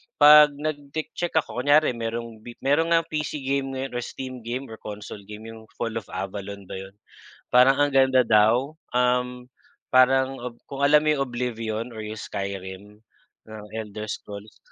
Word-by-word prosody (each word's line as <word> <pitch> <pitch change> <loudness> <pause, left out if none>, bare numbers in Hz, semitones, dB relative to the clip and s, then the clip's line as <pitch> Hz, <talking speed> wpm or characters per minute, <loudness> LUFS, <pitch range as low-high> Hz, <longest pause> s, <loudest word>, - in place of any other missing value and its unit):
'pag 150 0 +9
nag-ti-check 155 +3 -4
ako, 115 +2 -7
kunyari 145 +2 +4
merong 115 -1 -5
bi 120 +2 -11
meron 145 +5 +3
ngang 165 0 +4
PC 150 0 -2
game 135 0 -1 0.2
or 120 - -3
Steam 130 +1 -6
game 125 +3 -3
or 110 - -9
console 105 0 -8
game 105 +1 -9
yung 110 -1 -13
Fall 115 -1 -3
of 100 - -17
Avalon 100 +1 -6
ba - - -8
yun? 95 0 -11 0.6
Parang 130 +2 +6
ang 145 -1 +2
ganda 130 -2 +4
daw, 115 +7 +3 0.2
um, 125 0 0 0.5
parang 130 +1 +5
ob 120 -1 -7
kung 140 0 -6
alam 150 +1 +6
mo 155 - +4
yung 140 -2 0
Oblivion 115 -2 -3
or 110 - -6
yung 110 0 -6
Skyrim 100 +1 -6 0.5
ng 110 -1 -9
Elder 105 -1 -5
Scrolls, 105 +1 -8
125 Hz, 165 wpm, -25 LUFS, 110-135 Hz, 0.6 s, pag